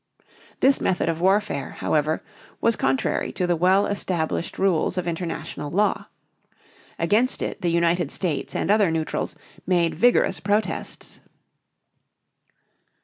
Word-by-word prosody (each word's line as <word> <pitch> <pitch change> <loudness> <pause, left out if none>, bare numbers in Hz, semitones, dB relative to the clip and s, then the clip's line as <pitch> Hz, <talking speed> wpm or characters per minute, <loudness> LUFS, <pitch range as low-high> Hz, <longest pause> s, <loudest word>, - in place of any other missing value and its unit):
This 270 +1 +4
method 180 -2 +1
of 165 0 -2
warfare, 190 -6 +1
however, 155 +1 0 0.4
was 230 - +2
contrary 135 0 0
to 180 - -1
the 175 -1 +1
well 185 +4 +3
established 175 -5 -2
rules 190 -1 +1
of 180 - -1
international 165 -3 -4
law. 205 +6 +1 0.9
Against 215 +10 +1
it - - -4
the 175 - +1
United 170 +1 +1
States 170 -7 -3
and - - 0
other 210 -3 +4
neutrals 160 -1 -2 0.3
made 175 -2 +2
vigorous 245 -9 +3
protests. 205 +6 -2
175 Hz, 120 wpm, -24 LUFS, 165-200 Hz, 0.9 s, This